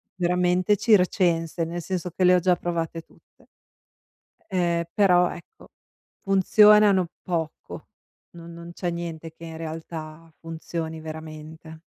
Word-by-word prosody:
veramente 180 +2 +1
da - - -13
circense 175 -6 +2
nel 170 +1 -5
senso 180 0 -4
che 185 - -2
le 180 0 +6
ho - - +4
già 180 0 +3
provate 165 -1 -3
tutte. - - -27 1.0
Ehm, 175 -3 0
però 180 -3 +4
ecco 440 - -15 0.5
funzionano 200 0 +5 0.2
poco 165 -3 -5 0.4
no 170 -1 -12
non 170 0 -10
c'è 175 0 -3
niente 165 -1 -6
che 165 - -12
in 165 -1 -8
realtà 160 0 -8
funzioni 165 0 -5
veramente. 160 0 -9
170 Hz, 125 wpm, -24 LUFS, 160-180 Hz, 1.0 s, le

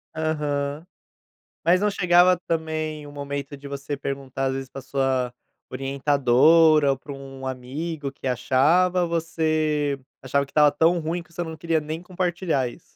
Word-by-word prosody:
Aham. 150 -1 -2 0.8
Mas 180 +3 +4
não 210 - +3
chegava 180 -2 +4
também 155 -2 -2
um - - -10
momento 140 0 -5
de 140 +1 -10
você 140 +1 -5
perguntar 135 -1 -4
às 130 - 0
vezes 135 0 -5
pra 135 - -8
sua 130 -2 -1 0.4
orientadora, 140 +3 +4
ou 135 - -1
para 140 - -10
um 135 -1 -8
amigo 140 +4 -4
que 135 - -7
achava? 165 +9 +3
Você 155 -3 0 0.2
achava 140 +2 0
que - - -21
estava 150 -1 +5
tão 165 +4 +3
ruim 165 +2 -3
que 170 0 -24
você 175 - -4
não 160 -2 -5
queria 165 -1 0
nem 155 +2 -5
compartilhar 175 -6 -1
isso. 160 - -14
150 Hz, 155 wpm, -24 LUFS, 135-165 Hz, 0.8 s, estava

